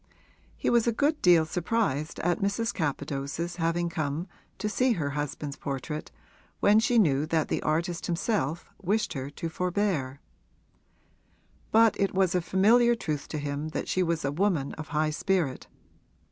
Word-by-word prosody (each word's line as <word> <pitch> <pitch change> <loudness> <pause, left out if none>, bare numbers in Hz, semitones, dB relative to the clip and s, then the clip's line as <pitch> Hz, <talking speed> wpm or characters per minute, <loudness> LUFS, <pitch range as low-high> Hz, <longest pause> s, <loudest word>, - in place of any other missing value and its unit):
He - - 0
was 235 -1 +3
a - - +4
good 295 +6 +1
deal 175 -3 +6
surprised 170 -3 -1
at 175 +1 +1
Mrs. 200 +2 0
Capadose's 150 +1 -3
having 170 +1 0
come 160 0 -3 0.3
to 210 - -2
see 250 +4 +2
her 150 -8 -2
husband's 145 0 -4
portrait 140 +2 -4 0.5
when 210 +1 +5
she 240 +2 +2
knew 150 -8 +3
that 160 -1 0
the - - -1
artist 170 +2 -1
himself 175 - -1
wished 205 +2 0
her 135 -2 -4
to 155 +3 -5
forbear; 175 -6 -1 1.5
but 225 0 +5
it 195 -1 +1
was 190 -2 +3
a 180 - +2
familiar 220 +8 +4
truth 155 -10 -4
to 155 - -4
him 145 +1 -3
that - - -3
she 185 - +1
was 170 -4 0
a 140 - 0
woman 165 -4 0
of 155 -1 -7
a - - -16
high 155 0 +1
spirit. 170 -4 -1
170 Hz, 160 wpm, -28 LUFS, 150-200 Hz, 1.5 s, deal